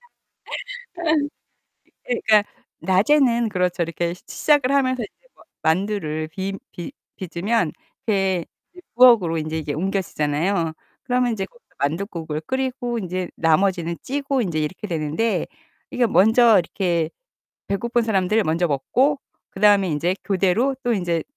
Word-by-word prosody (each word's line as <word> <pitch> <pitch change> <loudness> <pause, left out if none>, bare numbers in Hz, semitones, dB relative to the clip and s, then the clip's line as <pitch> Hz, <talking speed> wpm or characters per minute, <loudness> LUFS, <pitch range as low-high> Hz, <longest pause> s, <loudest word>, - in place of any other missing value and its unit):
아. 485 - -24 2.0
이게 245 - 0
그러니까 210 -1 +5 0.3
낮에는 235 +4 +3
그렇죠. 180 -2 0
이렇게 170 +1 -2
시 180 - -16
시작을 290 -3 +2
하면서 255 -3 +2
이제 - - -13
마 - - -19 0.3
만두를 160 -4 -2
비 190 +4 -4 0.2
빚 175 +9 -7 0.2
빚으면 185 0 -1 0.4
이렇게 195 -4 +1 0.3
이제 360 - -13
부엌으로 230 -10 +6
인제 155 0 -3
이게 150 -2 -3
옮겨지잖아요. 170 -1 -1 0.3
그러면 250 -1 +1
인제 200 -4 -2
거기서 475 - -25
만둣국을 160 0 -2
끓이고 255 +2 -2
인제 185 -2 -3
나머지는 170 +1 +1
찌고 275 -1 -1
인제 170 -8 -1
이렇게 170 +7 -3
되는데 165 +6 -1 0.5
이게 250 -1 +2
먼저 220 +3 +5
이렇게 170 -2 -1 0.6
배고픈 235 +4 0
사람들 215 0 +2
먼저 165 +3 +1
먹고 255 - +1 0.3
그다음에 200 -1 +4
인제 170 +4 0
교대로 200 +7 +2
또 245 - +1
인제 175 -6 0
195 Hz, 315 characters per minute, -22 LUFS, 170-235 Hz, 2.0 s, 부엌으로